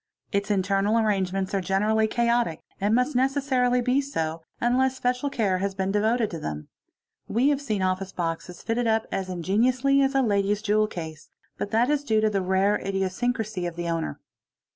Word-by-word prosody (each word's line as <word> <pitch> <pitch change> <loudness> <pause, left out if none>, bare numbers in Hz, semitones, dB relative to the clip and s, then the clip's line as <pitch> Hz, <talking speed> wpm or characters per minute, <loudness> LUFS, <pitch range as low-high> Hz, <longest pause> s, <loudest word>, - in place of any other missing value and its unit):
Its 200 0 -1
internal 200 +2 +2
arrangements 195 -3 0
are 195 - +1
generally 210 +4 +1
chaotic 235 -7 +1 0.2
and 205 +3 +2
must 250 +4 +1
necessarily 260 -2 +2
be 255 +3 +2
so, 165 - -3 0.2
unless 260 +2 +2
special 250 +2 0
care 200 -8 0
has 195 0 -2
been 190 0 -1
devoted 220 +2 +1
to 165 - -5
them. 75 - -6 0.6
We 245 +7 +2
have 285 -1 +1
seen 215 -8 -1
office 185 +1 -1
boxes 170 +1 -4
fitted 235 +1 0
up 220 0 +2
as 190 -1 -3
ingeniously 245 +10 +2
as 270 0 +1
a 270 - +4
lady's 205 -1 +1
jewel 215 +1 +2
case, 160 -5 -8 0.3
but - - -2
that 235 +6 +2
is 290 -1 +1
due 220 -6 +2
to 215 0 +2
the 195 -2 0
rare 190 +2 +2
idiosyncracy 195 0 -2
of 170 - -6
the 170 0 -3
owner. 165 - -2
210 Hz, 180 wpm, -25 LUFS, 190-245 Hz, 0.6 s, a